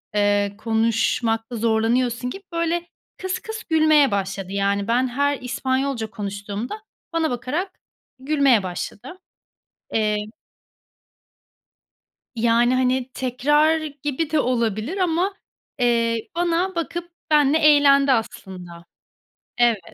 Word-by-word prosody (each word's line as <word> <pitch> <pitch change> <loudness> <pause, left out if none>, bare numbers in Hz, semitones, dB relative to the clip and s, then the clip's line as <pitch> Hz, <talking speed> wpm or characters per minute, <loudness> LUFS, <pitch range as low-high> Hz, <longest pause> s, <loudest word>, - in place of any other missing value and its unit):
eee, 205 -1 +2
konuşmakta 225 +1 0
zorlanıyorsun 235 +2 +1
gibi 390 +9 -8
böyle 335 +1 -1 0.3
kıs 375 0 -3
kıs 440 0 -7
gülmeye 310 -4 +4
başladı. 195 -1 -3
Yani, 200 0 0
ben 245 +3 +2
her 285 +3 0
İspanyolca 260 -1 -2
konuştuğumda 205 - -5 0.3
bana 325 -1 +1
bakarak 295 +11 -3 0.4
gülmeye 270 -6 +3
başladı. 200 - -6 0.7
Emm 210 -1 0 2.1
Yani, 235 +2 +3
hani, 255 0 +1
tekrar 295 +5 +2 0.2
gibi 295 +2 -1
de 310 - +2
olabilir 235 - -1
ama, 365 +1 +1 0.5
eee, 230 -2 +1
bana 350 +2 0
bakıp 340 +1 -4 0.2
benimle 295 0 +4
eğlendi 285 -3 +5
aslında 180 -7 -4 0.7
Evet. 240 -3 +3
250 Hz, 100 wpm, -22 LUFS, 220-305 Hz, 2.1 s, eğlendi